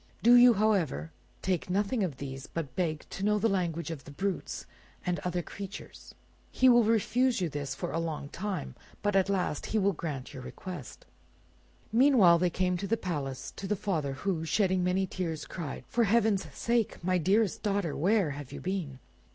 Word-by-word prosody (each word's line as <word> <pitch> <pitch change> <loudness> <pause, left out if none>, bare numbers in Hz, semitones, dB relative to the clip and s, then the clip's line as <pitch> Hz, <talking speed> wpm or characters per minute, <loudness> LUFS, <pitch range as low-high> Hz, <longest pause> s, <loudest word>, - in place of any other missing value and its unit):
Do 240 +2 +7
you, 245 -1 +8
however, 180 - +1 0.3
take 185 -2 -1
nothing 205 +4 +1
of 155 -8 -3
these, 135 -1 -6
but 145 -6 -5
beg 160 -4 -1
to 195 - -5
know 210 +1 +3
the 220 - +2
language 170 -5 -1
of 145 -5 -6
the - - -12
brutes 190 +6 -3 0.4
and 180 -1 0
other 180 -1 -2
creatures. 200 +2 -9 0.3
He 260 - +3
will 240 -1 +6
refuse 230 +3 +2
you 175 -3 0
this 145 -1 -4
for 175 - -4
a 165 - -1
long 160 -4 -3
time, 185 - -4 0.3
but 205 -1 +1
at 195 0 +3
last 180 -6 -1
he 220 - 0
will 200 -1 +3
grant 150 -6 -5
your 130 - -7
request." 165 +1 -8 0.9
Meanwhile 225 -8 +6
they 180 0 +2
came 180 +1 0
to 195 - -4
the 230 - +1
palace, 140 -9 -4
to 195 - -5
the 210 - +1
father, 165 -9 -1
who, 160 +4 -2
shedding 185 +2 +2
many 185 +1 +1
tears, 170 -4 -4
cried— 160 -6 -6
"For 235 -1 +2
heaven's 215 -2 +2
sake! 230 -6 -1
my 185 0 +2
dearest 195 +4 +2
daughter, 200 -7 0
where 190 -1 +2
have 140 -1 -8
you - - -6
been?" 180 -8 -3
185 Hz, 185 wpm, -30 LUFS, 160-205 Hz, 0.9 s, you